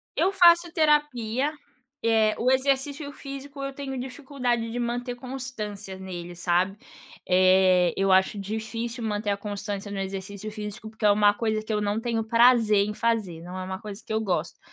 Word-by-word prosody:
Eu 385 Hz, -, +2 dB
faço 345 Hz, -2 st, +6 dB
terapia, 295 Hz, -4 st, +2 dB, 0.5 s
eh, 220 Hz, -1 st, +3 dB
o 250 Hz, -, +1 dB
exercício 275 Hz, +2 st, 0 dB
físico 275 Hz, 0 st, -8 dB
eu 275 Hz, 0 st, -4 dB
tenho 270 Hz, -2 st, -5 dB
dificuldade 250 Hz, -3 st, -2 dB
de 245 Hz, -, -3 dB
manter 245 Hz, +1 st, -2 dB
constância 220 Hz, -7 st, -6 dB
nele, 175 Hz, -2 st, -7 dB
sabe. 180 Hz, +3 st, +1 dB, 0.5 s
Eh, 185 Hz, -1 st, +5 dB
eu 195 Hz, 0 st, +2 dB
acho 190 Hz, +2 st, +4 dB
difícil 225 Hz, +3 st, -4 dB
manter 210 Hz, -1 st, -2 dB
a 200 Hz, -, +1 dB
constância 205 Hz, 0 st, -5 dB
no 195 Hz, -, -4 dB
exercício 195 Hz, +2 st, -5 dB
físico, 215 Hz, +1 st, -7 dB
porque 220 Hz, -1 st, -4 dB
é 205 Hz, -, +7 dB
uma 205 Hz, 0 st, +5 dB
coisa 215 Hz, 0 st, -1 dB
que 215 Hz, -, -3 dB
eu 210 Hz, -, 0 dB
não 205 Hz, +1 st, 0 dB
tenho 230 Hz, -1 st, -1 dB
prazer 225 Hz, -3 st, +5 dB
em 210 Hz, -, -3 dB
fazer, 210 Hz, -8 st, -1 dB
não 180 Hz, +2 st, -8 dB
é 185 Hz, -, -4 dB
uma 190 Hz, +1 st, -5 dB
coisa 210 Hz, 0 st, -8 dB
eu 220 Hz, 0 st, +1 dB
gosto. 175 Hz, -6 st, -2 dB
220 Hz, 170 wpm, -26 LUFS, 200-250 Hz, 0.5 s, é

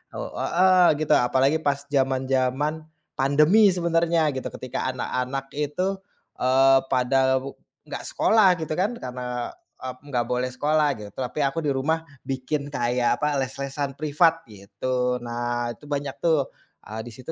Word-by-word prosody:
Oh -, -, -5 dB
heeh, 180 Hz, -2 st, +4 dB
gitu -, -, -2 dB
apalagi 135 Hz, +5 st, +2 dB
pas 140 Hz, -1 st, 0 dB
zaman-zaman 135 Hz, +2 st, 0 dB, 0.3 s
pandemi 150 Hz, +10 st, +5 dB
sebenarnya 170 Hz, -2 st, +1 dB
gitu 130 Hz, -, -3 dB
ketika 130 Hz, 0 st, -3 dB
anak-anak 130 Hz, +2 st, -3 dB
itu, 150 Hz, +7 st, -1 dB, 0.4 s
e 125 Hz, -, -2 dB, 0.4 s
pada 130 Hz, +1 st, +3 dB
wu 135 Hz, +1 st, -8 dB, 0.3 s
enggak -, -, -6 dB
sekolah 215 Hz, -3 st, +3 dB
gitu 155 Hz, -1 st, -3 dB
kan, 190 Hz, +7 st, +1 dB
karena 125 Hz, 0 st, -6 dB, 0.6 s
ep 130 Hz, 0 st, -6 dB
enggak 120 Hz, -3 st, 0 dB
boleh 125 Hz, +1 st, -1 dB
sekolah 150 Hz, +2 st, +1 dB
gitu 105 Hz, -1 st, -8 dB
tapi 130 Hz, +3 st, -4 dB
aku 135 Hz, +4 st, -1 dB
di 145 Hz, -, 0 dB
rumah 150 Hz, +5 st, 0 dB, 0.2 s
bikin 135 Hz, +2 st, -2 dB
kayak 125 Hz, -2 st, 0 dB
apa 150 Hz, -1 st, +1 dB
les-lesan 135 Hz, +1 st, -4 dB
privat 160 Hz, +3 st, +2 dB
gitu. 125 Hz, +6 st, -2 dB
Nah, 120 Hz, 0 st, -2 dB
itu 145 Hz, -, -13 dB
banyak 145 Hz, -1 st, -3 dB
tuh, 155 Hz, -5 st, +1 dB, 0.3 s
e -, -, -13 dB, 0.2 s
di -, -, -8 dB
situ 130 Hz, +5 st, -8 dB
135 Hz, 145 wpm, -24 LUFS, 130-155 Hz, 0.6 s, pandemi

